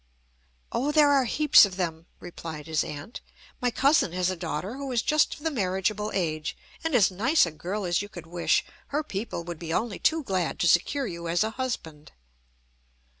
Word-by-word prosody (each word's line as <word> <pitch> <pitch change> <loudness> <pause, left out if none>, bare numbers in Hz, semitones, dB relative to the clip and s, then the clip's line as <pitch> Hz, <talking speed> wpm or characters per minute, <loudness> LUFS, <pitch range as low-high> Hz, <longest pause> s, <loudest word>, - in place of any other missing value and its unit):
"Oh! 280 +4 0
there 295 -1 +5
are 275 -2 +4
heaps 300 +4 +6
of 195 -3 +1
them," 165 -2 -3
replied 165 -3 -8
his 160 -2 0
aunt. 150 +10 -8 0.4
"My 250 - +2
cousin 270 - +3
has 180 0 +1
a - - -3
daughter 175 - -4
who 275 -1 -5
is 235 -3 +1
just 305 0 +2
of - - -15
the 320 - 0
marriageable 210 - -1
age, 155 -4 -2 0.3
and 325 -4 0
as 205 -6 +5
nice 230 - +3
a 170 - -5
girl 185 +6 -4
as 175 +1 +1
you 205 - -7
could 175 -4 -10
wish. 170 +1 +1 0.2
Her 300 +2 -1
people 205 - -4
would 170 -2 -7
be 165 -2 -6
only 215 +3 -1
too 320 -1 +2
glad 185 -7 -1
to 175 - +3
secure 260 - +2
you 170 -5 -6
as 170 +4 +2
a 220 - -2
husband." 195 - -5
190 Hz, 195 wpm, -27 LUFS, 170-260 Hz, 0.4 s, heaps